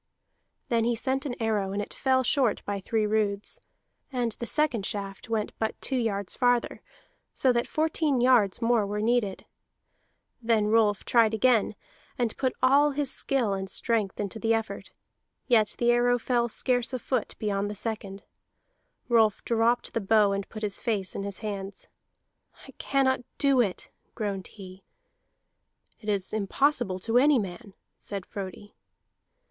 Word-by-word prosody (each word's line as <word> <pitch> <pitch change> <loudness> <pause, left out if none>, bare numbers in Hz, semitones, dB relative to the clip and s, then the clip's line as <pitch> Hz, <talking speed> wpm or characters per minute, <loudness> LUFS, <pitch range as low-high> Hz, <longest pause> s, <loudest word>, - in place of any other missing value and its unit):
Then 230 -1 +2
he 235 +1 +1
sent 265 +4 -1
an 245 - -4
arrow, 210 -4 0
and 200 - -2
it 205 - -5
fell 260 -1 +2
short 250 -3 +1
by 200 -1 -2
three 215 +2 0
roods; 210 -1 -1 0.5
and 245 -3 -1
the 235 - -4
second 295 -8 0
shaft 195 +1 -5
went 220 -2 -1
but 220 0 -2
two 270 - -1
yards 205 -6 -1
farther, 245 -1 +1 0.5
so 260 -2 +3
that 235 0 0
fourteen 310 -3 0
yards 240 -4 +3
more 230 -2 +3
were 205 +1 -3
needed. 220 -3 0 1.0
Then 225 -2 +2
Rolf 215 -2 +2
tried 225 -2 +4
again, 225 -1 +2 0.4
and 235 -3 -1
put 260 -2 -1
all 280 +3 +5
his 285 -1 -1
skill 245 -7 +1
and 190 0 -4
strength 215 -2 -1
into 205 +2 -3
the 225 +1 +2
effort, 225 0 -4 0.6
yet 220 -4 +3
the 240 0 +3
arrow 245 0 +3
fell 240 0 0
scarce 245 +2 0
a - - 0
foot 250 -1 -2
beyond 205 -1 -1
the 210 - -5
second. 205 -2 -5 0.8
Rolf 225 -4 +3
dropped 235 +1 +1
the 230 - -1
bow 210 0 +4
and 200 0 -3
put 215 -1 -8
his 205 -2 -1
face 210 -6 -2
in - - -4
his 200 -1 -5
hands. 200 -1 -5 0.8
"I - - -11
cannot 265 -2 +1 0.2
do 275 -3 +4
it," 195 -6 -3 0.2
groaned 200 -4 -3
he. 190 -2 -12 1.2
"It 210 - -6
is 200 -2 -1
impossible 215 -1 +1
to 230 +4 +3
any 290 +1 +5
man," 200 0 -5 0.2
said 200 -2 -6
Frodi. 200 0 -8
225 Hz, 155 wpm, -27 LUFS, 200-245 Hz, 1.2 s, all